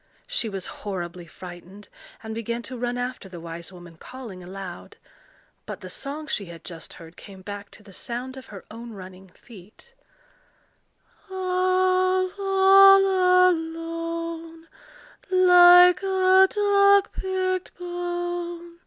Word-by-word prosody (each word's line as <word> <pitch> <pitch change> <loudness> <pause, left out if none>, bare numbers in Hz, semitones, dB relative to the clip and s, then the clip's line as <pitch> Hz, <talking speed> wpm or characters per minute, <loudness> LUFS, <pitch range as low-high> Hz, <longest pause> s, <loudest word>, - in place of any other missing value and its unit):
She - - -2
was 195 -2 -6 0.2
horribly 175 -3 -6
frightened, 180 +4 -12 0.4
and 220 0 -6
began 235 +1 -4
to 260 - -8
run 245 0 -3
after 245 -5 -5
the 175 -2 -10
wise 170 +2 -9
woman, 175 -2 -14
calling 235 -4 -10
aloud. 185 0 -9 0.7
But - - -7
the - - -9
song 295 +2 -6
she 280 -9 -3
had 170 -1 -12
just 165 -2 -10
heard 165 0 -14
came 190 -2 -14
back 205 +1 -8
to 210 - -17
the 200 -2 -16
sound 245 +6 -6
of 265 - -11
her 200 -3 -11
own 230 +1 -9
running 190 -1 -12
feet,— 210 - -17 1.4
All 370 0 +1
all 385 -1 +5
alone, 330 0 -5 0.6
Like 360 -1 +7
a 380 0 +4
dog 400 -1 +3
picked 370 -1 -3
bone! 350 -1 -5
325 Hz, 125 wpm, -24 LUFS, -, 1.4 s, Like